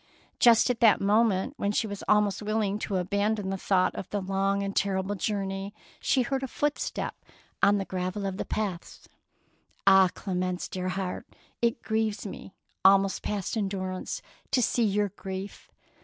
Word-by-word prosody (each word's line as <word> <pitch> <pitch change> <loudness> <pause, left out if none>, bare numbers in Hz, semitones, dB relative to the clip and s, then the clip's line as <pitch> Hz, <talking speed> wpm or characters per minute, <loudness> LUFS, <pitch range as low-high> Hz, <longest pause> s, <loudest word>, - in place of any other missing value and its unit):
Just 235 +1 +6
at 245 - -4
that 225 -3 +6
moment, 210 +3 +2
when 200 - 0
she 215 - +1
was 200 -2 -6
almost 210 -2 +3
willing 210 -1 0
to 205 - -3
abandon 200 +2 0
the - - -1
thought 185 -1 +2
of 190 - -6
the 205 - -1
long 195 +1 0
and 195 0 -4
terrible 195 0 0
journey, 195 0 -3 0.2
she 255 - +2
heard 265 +2 -1
a 265 - -3
footstep 295 +3 -2 0.5
on 205 +1 +5
the 195 - -2
gravel 185 +2 -3
of 190 -1 -3
the - - -3
paths. 195 -5 -4 0.4
" - - -39
Ah, 190 -1 +7
Clemence, 185 -2 -2
dear 185 0 -3
heart, 185 0 -4 0.3
it 235 0 +1
grieves 220 -1 -1
me 195 -1 -8 0.3
almost 195 0 +5
past 205 -1 -3
endurance 190 -3 -3 0.3
to 255 -3 +2
see 235 - +2
your 205 0 +1
grief. 190 0 -7
200 Hz, 165 wpm, -28 LUFS, 190-215 Hz, 0.5 s, Ah